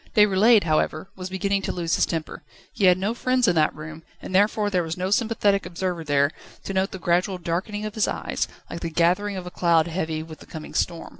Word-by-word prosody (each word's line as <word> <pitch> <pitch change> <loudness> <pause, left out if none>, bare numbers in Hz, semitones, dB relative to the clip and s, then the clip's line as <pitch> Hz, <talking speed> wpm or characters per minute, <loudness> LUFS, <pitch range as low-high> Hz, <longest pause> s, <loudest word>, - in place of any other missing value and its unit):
Déroulède, 210 +1 +5
however, 155 +1 0
was 185 0 -6
beginning 195 +1 0
to - - -2
lose 170 -2 -2
his - - +3
temper. 160 -2 -4 0.3
He 200 - +1
had 180 -1 +6
no 200 +4 -1
friends 255 0 +1
in 180 - +4
that 155 -1 +2
room, 155 +1 -9 0.2
and - - -8
therefore 205 +2 +2
there 180 -2 +2
was 165 0 -4
no 185 +1 -2
sympathetic 210 -3 +2
observer 180 -1 -3
there, 145 -1 +2 0.3
to 195 - -5
note 190 0 +1
the - - -7
gradual 180 +2 +1
darkening 185 +5 -3
of 215 - -5
his 215 - +1
eyes, - - -2 0.2
like - - -6
the 170 - -4
gathering 180 +5 +1
of 185 - -6
a 180 - -7
cloud 170 -3 +3
heavy 160 -2 -3
with 160 -1 -11
the - - -14
coming 155 -2 -9
storm. 170 -2 -2
180 Hz, 225 wpm, -24 LUFS, 165-200 Hz, 0.3 s, had